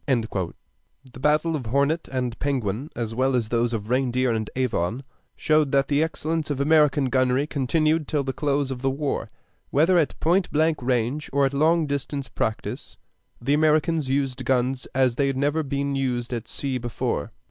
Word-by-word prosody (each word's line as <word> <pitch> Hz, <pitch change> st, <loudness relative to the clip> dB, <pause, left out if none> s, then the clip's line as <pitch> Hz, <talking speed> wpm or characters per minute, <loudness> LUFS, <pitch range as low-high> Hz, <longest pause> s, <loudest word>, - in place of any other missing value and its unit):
The 110 Hz, -, -4 dB
battle 150 Hz, +4 st, +2 dB
of 150 Hz, -, -2 dB
the 115 Hz, -, -7 dB
Hornet 140 Hz, +6 st, +1 dB
and 125 Hz, -2 st, -2 dB
Penguin, 130 Hz, -1 st, -2 dB
as 115 Hz, -2 st, -3 dB
well 130 Hz, +2 st, +1 dB
as 115 Hz, -3 st, 0 dB
those 120 Hz, 0 st, +1 dB
of 110 Hz, -3 st, -2 dB
the 110 Hz, -, -8 dB
Reindeer 130 Hz, -1 st, +1 dB
and 110 Hz, -2 st, -2 dB
Avon, 125 Hz, -2 st, -1 dB, 0.3 s
showed 155 Hz, -3 st, +2 dB
that 135 Hz, 0 st, +3 dB
the 145 Hz, 0 st, +2 dB
excellence 160 Hz, 0 st, -2 dB
of 145 Hz, -2 st, -2 dB
American 150 Hz, -1 st, +4 dB
gunnery 130 Hz, +1 st, +2 dB
continued 155 Hz, +2 st, +1 dB
till 145 Hz, -2 st, 0 dB
the 135 Hz, 0 st, -3 dB
close 140 Hz, -1 st, 0 dB
of 125 Hz, -2 st, -5 dB
the 135 Hz, -, +1 dB
war. 140 Hz, +1 st, -2 dB, 0.4 s
Whether 165 Hz, +5 st, +4 dB
at 155 Hz, -, -1 dB
point 180 Hz, +3 st, +2 dB
blank 155 Hz, 0 st, +1 dB
range 125 Hz, +4 st, -1 dB
or 140 Hz, 0 st, +3 dB
at 135 Hz, -, -1 dB
long 160 Hz, +3 st, +3 dB
distance 140 Hz, -2 st, -3 dB
practice, 110 Hz, -1 st, -4 dB, 0.4 s
the 140 Hz, +4 st, 0 dB
Americans 155 Hz, -1 st, +2 dB
used 135 Hz, -1 st, -1 dB
guns 130 Hz, +1 st, 0 dB
as 130 Hz, -2 st, +2 dB
they 140 Hz, -, +2 dB
had 135 Hz, -1 st, -1 dB
never 145 Hz, +3 st, +1 dB
been 140 Hz, -1 st, -2 dB
used 125 Hz, -2 st, -1 dB
at 115 Hz, -2 st, -4 dB
sea 135 Hz, -2 st, -3 dB
before. 120 Hz, -2 st, -2 dB
135 Hz, 180 wpm, -24 LUFS, 125-150 Hz, 0.4 s, American